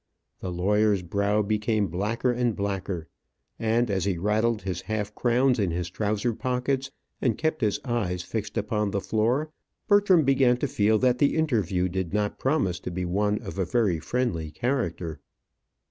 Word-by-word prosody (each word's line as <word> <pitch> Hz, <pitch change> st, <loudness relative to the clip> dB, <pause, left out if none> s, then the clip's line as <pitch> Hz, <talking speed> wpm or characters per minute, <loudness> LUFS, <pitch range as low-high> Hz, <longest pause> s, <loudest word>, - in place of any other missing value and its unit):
The 90 Hz, -, -4 dB
lawyer's 100 Hz, +2 st, +2 dB
brow 100 Hz, +4 st, +1 dB
became 105 Hz, 0 st, +1 dB
blacker 105 Hz, +8 st, -1 dB
and 120 Hz, -2 st, 0 dB
blacker, 95 Hz, -4 st, -3 dB, 0.5 s
and 115 Hz, +2 st, +2 dB
as 95 Hz, -2 st, 0 dB
he 95 Hz, -3 st, 0 dB
rattled 105 Hz, +3 st, +1 dB
his 95 Hz, -2 st, -3 dB
half 105 Hz, -1 st, -3 dB
crowns 125 Hz, +2 st, +2 dB
in 100 Hz, -3 st, +1 dB
his 85 Hz, +1 st, -3 dB
trousers 105 Hz, +3 st, -1 dB
pockets, 130 Hz, +1 st, -1 dB, 0.3 s
and 120 Hz, -5 st, +1 dB
kept 155 Hz, -1 st, -1 dB
his 105 Hz, -3 st, +1 dB
eyes 95 Hz, -8 st, -1 dB
fixed 110 Hz, 0 st, -4 dB
upon 105 Hz, 0 st, 0 dB
the 100 Hz, -, -1 dB
floor, 120 Hz, +10 st, 0 dB, 0.4 s
Bertram 205 Hz, -5 st, +5 dB
began 135 Hz, -2 st, +4 dB
to 145 Hz, -, -1 dB
feel 110 Hz, -2 st, +2 dB
that 125 Hz, +1 st, +2 dB
the 145 Hz, -, +3 dB
interview 105 Hz, -, +1 dB
did 95 Hz, 0 st, -3 dB
not 105 Hz, -1 st, -1 dB
promise 130 Hz, -, +1 dB
to -, -, -5 dB
be 90 Hz, +1 st, -3 dB
one 105 Hz, +4 st, +1 dB
of -, -, -6 dB
a -, -, +3 dB
very 95 Hz, -3 st, +1 dB
friendly 85 Hz, -5 st, -1 dB
character. 85 Hz, -, -2 dB
105 Hz, 165 wpm, -26 LUFS, 95-125 Hz, 0.5 s, Bertram